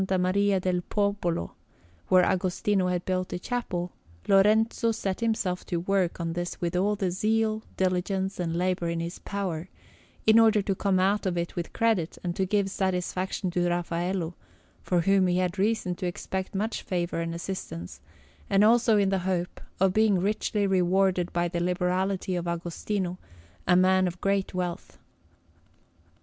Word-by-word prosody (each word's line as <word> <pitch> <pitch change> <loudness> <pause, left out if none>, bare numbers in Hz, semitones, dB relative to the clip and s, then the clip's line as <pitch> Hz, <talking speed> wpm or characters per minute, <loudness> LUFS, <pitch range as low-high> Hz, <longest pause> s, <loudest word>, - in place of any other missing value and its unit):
Maria 195 +2 +2
del 180 -1 0
Popolo, 200 - -1 0.6
where 185 -1 +5
Agostino 185 +1 +1
had 180 -1 -1
built 185 -1 -1
a - - -1
chapel, 180 -5 -3 0.4
Lorenzo 220 +3 +4
set 195 -4 -3
himself 220 -6 -1
to 175 - -3
work 185 0 0
on 165 -1 -2
this 175 +1 -4
with 175 0 -2
all 200 +3 +2
the 190 -3 -1
zeal, 220 +3 +1 0.2
diligence, 190 +1 -1
and 165 -2 -1
labour 180 -1 0
in 170 0 -2
his 170 +2 -5
power, 185 -4 -4 0.6
in 220 +1 +7
order 220 -1 +5
to 195 - 0
come 190 0 +1
out 195 +2 +2
of 175 -2 -1
it 170 0 -3
with 170 -1 -4
credit 220 -8 0
and 175 -1 -2
to 190 - 0
give 200 0 +1
satisfaction 185 0 -1
to 175 0 +1
Raffaello, 175 0 -2 0.5
from 180 -2 +1
whom 195 0 +4
he 180 0 +1
had 185 +1 -1
reason 210 -3 +1
to 185 - -2
expect 190 +2 -4
much 215 +4 -1
favour 175 -2 -2
and 165 0 -3
assistance, 170 - -6 0.5
and 195 +1 +4
also 225 0 +5
in 200 -1 +3
the 195 -1 +1
hope 180 -1 -2 0.2
of 190 0 +3
being 215 -2 +4
richly 205 +2 0
rewarded 185 -1 +2
by 175 0 0
the 170 0 -3
liberality 180 +1 0
of 175 -1 -3
Agostino, 175 +2 -3 0.5
a 180 - +5
man 185 +1 +4
of 175 0 -5
great 195 -1 0
wealth. 180 -2 -4
185 Hz, 160 wpm, -27 LUFS, 175-200 Hz, 0.6 s, in